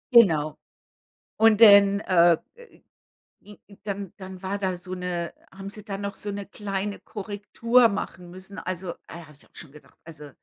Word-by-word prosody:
Genau. 155 -10 +5 0.8
Und 220 -1 +5
denn, 200 -2 +8
äh, 175 -4 +4 1.1
i 210 0 -15
n 200 - -17
dann 200 -2 -5
dann 190 -1 -10
war 200 +2 -3
da 190 -2 -1
so 180 +1 -9
'ne 180 -2 -4 0.2
haben 195 +1 -8
sie 210 0 -11
da 200 -2 -5
noch 200 0 -5
so 205 - -5
'ne 200 0 -5
kleine 200 0 -4
Korrektur 220 +4 +1
machen 180 -3 -5
müssen. 185 +3 -10
Also, 185 -1 -5 0.2
äh, - - -10
habe 150 0 -16
ich 145 - -18
auch - - -34
schon 145 - -11
gedacht: 150 - -18
„Also“ 150 -3 -11
195 Hz, 175 wpm, -25 LUFS, 175-205 Hz, 1.1 s, denn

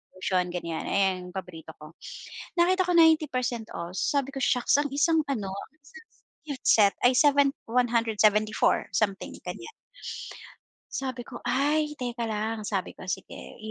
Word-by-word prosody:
lotion, 185 -1 0
ganyan 170 -2 -4
ayun 190 -2 0
yung 180 - -16
paborito 170 -4 -7
ko, 155 +1 -12 0.7
nakita 370 +2 +3
ko 360 - +1
90% 280 -8 +3
off, 170 +1 -5
sabi 275 +4 0
ko 270 - -4
shocks 245 +2 +3
ang 290 - +1
isang 320 +3 +3
ano 210 -8 -2
ang 195 - -7
isang 460 +10 -15 0.6
set 205 -2 +5
ay 245 - +7
7 285 -1 +5 0.2
174 225 -3 +2
something 200 -3 -1
ganyan. - - -6 1.2
Sabi 260 -2 -3
ko 240 - -9
ay 300 +2 0
teka 240 -2 -3
lang, 215 +1 -2
sabi 195 -3 -3
ko - - -13
sige 190 - -5
i. 220 -1 -9
235 Hz, 145 wpm, -27 LUFS, 195-280 Hz, 1.2 s, ay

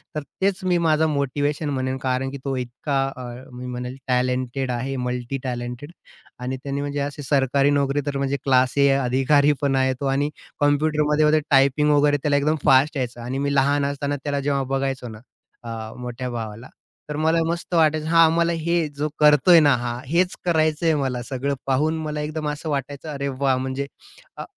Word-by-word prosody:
तर 150 - -1 0.2
तेच 195 -1 +1
मी 180 -1 +2
माझं 155 0 +3
मोटिवेशन 145 +2 -1
म्हणेन. 130 -1 -2
कारण 130 +1 0
की 140 - -6
तो 135 -1 -1
इतका 135 +3 -2
अ, 130 - -8 0.3
मी 125 0 -8
म्हणेल 125 +1 -5
टॅलेंटेड 125 +1 0
आहे. 130 +3 -3
मल्टी 125 +1 -3
टॅलेंटेड 125 +3 -5 0.5
आणि 125 +1 -3
त्याने 140 0 -3
म्हणजे 145 0 -3
अशी 145 +1 -4
सरकारी 140 0 +2
नोकरी, 145 0 +1
तर 145 -1 -2
म्हणजे 140 0 -1
क्लास 130 -1 +2
ए 140 0 +5
अधिकारी 135 +3 +3
पण 140 -1 +1
आहे 130 0 +2
तो. 140 - -3
आणि 140 +2 +1 0.3
कॉम्प्युटरमध्ये 150 +1 +3
टायपिंग 140 +1 +4
वगैरे, 145 0 +4
त्याला 145 -1 +2
एकदम 150 +2 +1
फास्ट 135 +3 +4
यायचं 120 -2 -3
आणि 125 +3 -4
मी 140 +1 -1
लहान 140 +1 +2
असताना 140 0 -2
त्याला 140 -1 -1
जेव्हा 140 -1 0
बघायचो 135 -2 -2
ना, 110 -1 -10 0.4
अ, 115 -1 -6
मोठ्या 125 +1 -5
भावाला, 115 0 -6 0.4
तर 150 - -3
मला 160 +2 +2
मस्त 170 +2 -4
वाटायचं. 155 -1 +3
हा 165 0 +6
आम्हाला, 170 +1 +2
हे 170 0 0
जो 150 +1 0
करतोय 150 +3 +6
ना, 145 -3 +5
हा 120 0 -4
हेच 175 +6 +1
करायचंय 160 -1 +2
मला. 130 -4 -1
सगळं 135 +2 -2
पाहून 150 +4 +1
मला 150 -1 -3
एकदम 150 0 -3
असं 150 +2 -5
वाटायचं, 140 +1 -4
अरे 140 -2 -3
वाह! 135 0 +1
म्हणजे 130 +2 -3 0.5
अ, - - -5
140 Hz, 180 wpm, -23 LUFS, 130-150 Hz, 0.5 s, हा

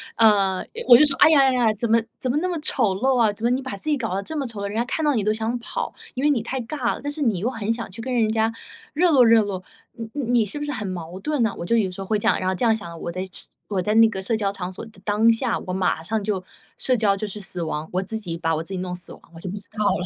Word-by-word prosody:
呃， 200 -4 +4 0.2
我 240 - +10
就 300 - +6
说： 280 -2 0
“哎 - - +9
呀， 310 -3 +6
哎 265 -1 +4
呀， 240 -3 +3
怎 235 +3 -2
么 230 0 +5 0.2
怎 255 - -1
么 275 - 0
那 350 +4 0
么 350 -3 -2
丑 225 -10 +1
陋 255 +5 +2
啊， 220 -3 +4
怎 220 - -12
么 240 - +3
你 255 +2 +1
把 260 -7 -6
自 195 - -4
己 300 - +3
搞 225 -7 -2
得 195 - -2
这 315 - -6
么 280 -4 -2
丑 220 -3 -7
陋， - - -2
人 200 - -6
家 230 - +2
看 310 +5 -2
到 295 - +3
你 220 -5 0
都 215 - +2
想 225 +2 -1
跑。 235 - -4 0.2
“因 260 - -2
为 295 - +4
你 255 -6 +1
太 260 +4 -4
尬 245 0 -2
了， - - -10
但 290 - -2
是 300 +1 -7
你 225 -8 +2
又 210 - -1
很 225 -3 -2
想 230 -2 -3
去 205 - -8
跟 255 - -4
人 225 -3 +2
家 220 0 +1 0.4
热 340 +4 +3
络 265 -5 +6
热 225 -1 +6
络， 190 -3 -4 0.3
你 225 -1 -7
你 240 -1 +3
是 205 - -5
不 295 - -3
是 295 - -3
很 215 -7 -4
矛 180 -1 -6
盾 300 +1 0
呢？ 220 -3 +1
我 - - -3
就 230 +6 +2
有 200 -5 +1
时 185 - -8
候 195 - -6
会 215 - +2
这 - - -1
样 - - +3
然 185 - 0
后 190 - 0
这 240 - 0
样 225 -1 +4
想， 170 -6 -8
我 170 - -3
在 185 +2 -4
只 185 - -6 0.2
我 200 -3 -1
在 210 +4 0
那 225 0 +7
个 195 - -5
社 195 +4 -1
交 205 -3 0
场 185 -2 -5
所 - - -7
的 220 -3 -17
当 215 +2 +4
下， 230 +1 0
我 185 - -6
马 185 -3 0
上 215 +5 -2
就 200 -3 -2 0.4
社 255 -1 +2
交 205 -3 +3
就 210 +2 -3
是 205 +1 -7
死 185 -3 0
亡， 155 -1 -3
我 185 - +1
自 210 +4 -2
己 180 -6 -4
把 165 -1 0
我 160 - -2
自 190 - -6
己 185 - -3
弄 180 -1 -4
死 180 -1 -5
亡 - - -15
了， - - -23
我 - - -9
就 185 - -8
不 190 - -5
知 - - -5 0.2
道 215 - 0
了。 180 - +1
220 Hz, 360 characters per minute, -23 LUFS, 190-245 Hz, 0.4 s, 我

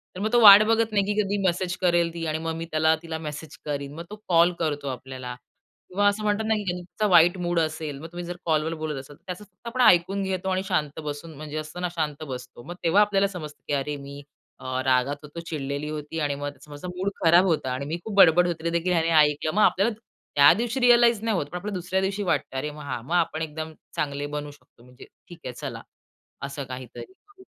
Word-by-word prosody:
तर - - -6
मग 215 +2 -1
तो 240 - +6
वाट 205 -1 +11
बघत 225 0 +2
नाही, 205 -2 +2
की 210 - 0
कधी 205 0 -1
मेसेज 180 0 0
करेल 170 -2 +2
ती 165 -1 -4
आणि 155 0 -1
मग 165 0 -3
मी 165 0 -5
त्याला 160 0 +3
तिला 165 -1 -4
मेसेज 150 0 -8
करीन. 140 -1 -4
मग 165 - -6
तो 210 - -7
कॉल 170 0 +5
करतो 145 -3 -2
आपल्याला. 130 -1 -6 0.5
किंवा 205 +2 +2
असं 205 +1 +1
म्हणतात 210 +1 0
ना 220 - +3
की 210 - -3
त्यांचा 180 +4 -3
वाईट 175 +2 +6
मूड 175 -1 0
असेल, 155 -2 -2
मग 160 - -8
तुम्ही 175 0 -6
जर 175 0 -5
कॉलवर 160 0 +1
बोलत 155 -3 -4
असाल 140 +2 -12
तर - - -31
त्याचं 180 +2 -6
फक्त 205 +3 -16
आपण 255 +2 -1
ऐकून 195 -2 +4
घेतो 190 0 -2
आणि 185 0 0
शांत 155 -5 -1
बसून 150 +2 -6
म्हणजे 155 0 -6
असतं 155 +3 -6
ना 180 - 0
शांत 155 -2 -2
बसतो. 125 -2 -8
मग 175 +6 -8
तेव्हा 175 +5 +4
आपल्याला 200 -1 +3
समजतं 155 -6 -9
की 145 - -2
"अरे 140 +1 -1
मी, 140 +1 -9 0.4
अ, 130 0 -3
रागात 130 +2 +2
होतो, 150 +3 -9
चिडलेली 150 -3 -4
होती 155 +1 -5
आणि 145 -2 0
मग 145 0 -6
समोरचा 150 +4 -9
मूड 190 +2 -1
खराब 170 +3 +6
होता." 155 -7 0
आणि 135 +2 -4
"मी 160 +4 -3
खूप 220 -2 -5
बडबड 180 -1 +7
होती 165 -2 -4
ते - - +2
देखील 170 +2 0
ह्याने 165 -1 +2
ऐकलं." 150 +1 +1
मग 215 - +3
आपल्याला 210 +5 +3 0.4
त्या 145 0 +8
दिवशी 240 +3 -2
रिअलाईज 240 -3 +5
नाही 220 -4 +1
होत, 145 - -1
पण 175 +5 -7
आपल्याला 200 +3 -5
दुसऱ्या 185 +2 -1
दिवशी 195 +2 -1
वाटतं. 150 -6 -1
अरे 150 +3 -3
मग 150 0 -10
हां. 130 -4 -4
मग 160 - -4
आपण 165 -2 +1
एकदम 160 0 -5 0.2
चांगले 145 -1 -2
बनू 145 0 -4
शकतो, 145 -4 -22
म्हणजे 125 0 -15 0.2
ठीक 175 -1 -11
आहे 125 - -4
चला. - - -6 0.6
असं 140 +1 -5
काहीतरी. 125 -2 -8 0.3
हं. 380 - -15
165 Hz, 235 wpm, -25 LUFS, 145-185 Hz, 0.6 s, वाट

